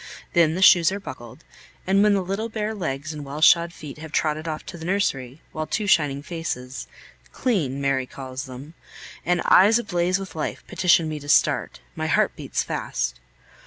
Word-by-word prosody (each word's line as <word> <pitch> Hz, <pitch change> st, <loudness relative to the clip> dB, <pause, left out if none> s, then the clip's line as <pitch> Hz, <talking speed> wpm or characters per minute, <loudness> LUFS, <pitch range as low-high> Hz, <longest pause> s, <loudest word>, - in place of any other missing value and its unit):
Then 165 Hz, -2 st, +4 dB
the 190 Hz, -, +1 dB
shoes 175 Hz, -2 st, +7 dB
are 200 Hz, -, -3 dB
buckled; 130 Hz, -, -10 dB, 0.4 s
and 195 Hz, +1 st, +3 dB
when 210 Hz, -1 st, +4 dB
the 195 Hz, -, 0 dB
little 200 Hz, +5 st, -3 dB
bare 220 Hz, -1 st, -3 dB
legs 155 Hz, -6 st, -4 dB
and 150 Hz, -1 st, -7 dB
well 140 Hz, +2 st, -6 dB
shod 170 Hz, +1 st, +5 dB
feet 150 Hz, -3 st, -10 dB
have 160 Hz, -1 st, -9 dB
trotted 155 Hz, 0 st, -1 dB
off 155 Hz, -1 st, -4 dB
to 180 Hz, -, -8 dB
the -, -, -9 dB
nursery, 155 Hz, -8 st, -1 dB
while 155 Hz, 0 st, -4 dB
two 215 Hz, -, -2 dB
shining 145 Hz, -7 st, +2 dB
faces 145 Hz, -7 st, -5 dB, 0.4 s
(clean, 160 Hz, -, -1 dB
Mary 135 Hz, -2 st, 0 dB
calls 130 Hz, +1 st, -7 dB
them) 130 Hz, +4 st, -10 dB, 0.5 s
and 180 Hz, 0 st, +2 dB
eyes 210 Hz, +5 st, +6 dB
ablaze 180 Hz, -5 st, 0 dB
with 195 Hz, -1 st, -8 dB
life 155 Hz, -, -4 dB
petition 175 Hz, -3 st, +3 dB
me 155 Hz, -1 st, -4 dB
to 145 Hz, 0 st, -10 dB
start, -, -, +2 dB
my -, -, -2 dB
heart -, -, +2 dB
beats -, -, -2 dB
fast. 65 Hz, -, -3 dB
160 Hz, 185 wpm, -23 LUFS, 140-190 Hz, 0.5 s, shoes